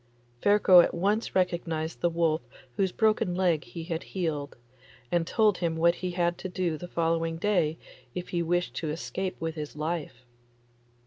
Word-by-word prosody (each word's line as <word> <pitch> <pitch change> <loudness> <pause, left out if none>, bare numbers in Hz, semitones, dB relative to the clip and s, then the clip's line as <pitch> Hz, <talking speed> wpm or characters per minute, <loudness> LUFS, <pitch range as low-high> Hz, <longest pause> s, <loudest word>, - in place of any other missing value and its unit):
Ferko 205 -3 +7
at - - -1
once 205 +6 0
recognised 170 -3 -1
the 175 - +3
wolf 165 -2 +1 0.3
whose 190 -2 +1
broken 215 -5 +2
leg 175 -5 +2
he 165 +8 -8
had 165 0 -3
healed, 155 -6 -3 0.5
and 170 -1 +1
told 215 -3 +3
him 170 -2 0
what 170 +1 +4
he 180 +1 -4
had 175 -1 0
to 185 - -5
do 180 -3 -1
the 175 +3 -7
following 165 -1 0
day 170 -5 +1 0.4
if 180 0 -5
he 175 - 0
wished 175 +1 0
to 160 - -3
escape 185 +4 -3
with 165 0 -2
his 150 -2 -6
life. 150 -5 -4
170 Hz, 170 wpm, -28 LUFS, 160-185 Hz, 0.5 s, Ferko